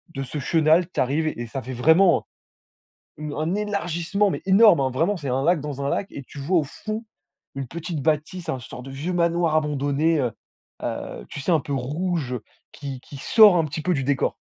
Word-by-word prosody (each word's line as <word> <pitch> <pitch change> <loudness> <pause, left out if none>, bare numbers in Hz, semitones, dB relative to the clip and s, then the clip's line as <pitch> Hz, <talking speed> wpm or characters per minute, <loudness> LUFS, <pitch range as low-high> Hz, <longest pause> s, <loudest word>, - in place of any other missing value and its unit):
de 135 - -2
ce 140 +3 -5
chenal. 160 +4 +3
Tu - - -4
arrives 145 +5 +1
et 120 -6 -3
ça 135 +3 -5
fait 130 +2 -7
vraiment 160 +8 +4 0.9
une 150 -1 -5
un 160 +6 -1
élargissement, 200 -1 0
mais - - -3
énorme, 195 -4 +6
hein, 130 -1 0
vraiment. 170 +10 +1
C'est 140 -5 -5
un 130 +2 0
lac 170 -2 +3
dans 145 -2 -5
un 140 - 0
lac 195 - -1
et 140 - -7
tu 145 - -14
vois 170 +6 +2
au - - 0
fond 215 - -6 0.5
une 135 -2 -4
petite 165 0 -5
bâtisse, 155 +4 -1
un 130 - -2
sorte 125 +1 -10
de 135 - -8
vieux 150 +7 -3
manoir 170 -2 +1
abandonné, 150 +1 +1
heu. 125 -3 0 0.5
Heu, - - -5
tu - - -7
sais, 180 - 0
un 160 -4 +3
peu 140 - -5
rouge 145 0 -2 0.3
qui 135 -3 -7
qui 140 - -11
sort 210 - +6
un 165 - +2
petit 155 +1 -5
peu 180 +3 +1
du 135 - -1
décor. 135 0 0
155 Hz, 210 wpm, -24 LUFS, 135-175 Hz, 0.9 s, énorme